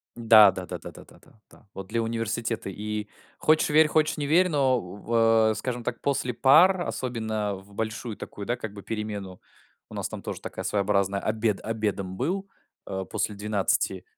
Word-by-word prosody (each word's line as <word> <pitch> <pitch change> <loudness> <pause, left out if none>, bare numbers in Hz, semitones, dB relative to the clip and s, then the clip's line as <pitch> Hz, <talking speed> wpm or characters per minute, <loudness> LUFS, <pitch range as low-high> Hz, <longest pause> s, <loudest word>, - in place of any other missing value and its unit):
Да, 110 -3 +7
да-да-да, 95 -1 -7
да-да-да, - - -17 0.2
да, - - -20
вот 95 -1 -8
для 115 +1 -1
университета 115 -1 -2
и 105 +2 -4 0.3
хочешь 155 +1 +3
верь, 155 +1 +6
хочешь 155 0 +1
не 145 - -2
верь, 175 +5 +4
но 135 -4 +2
у 90 -2 -9
в 115 0 +3
а, - - 0
скажем 125 0 -4
так, 115 - -4
после 130 -3 -1
пар, 160 +10 +5
особенно 110 - -2
в 95 +1 -14
большую 110 +1 -4
такую, 100 - -8
да, 120 - 0
как 110 -4 -6
бы 100 - -9
перемену, 105 -4 -5 0.5
у - - -12
нас - - -3
там - - -7
тоже - - -6
такая - - -6
своеобразная 100 -1 +1
обед 110 0 -1
обедом 105 -4 -3
был, 190 - -2 0.4
а, 95 0 -4
после 105 - -2
12, 105 -1 0
110 Hz, 175 wpm, -26 LUFS, 100-125 Hz, 0.5 s, Да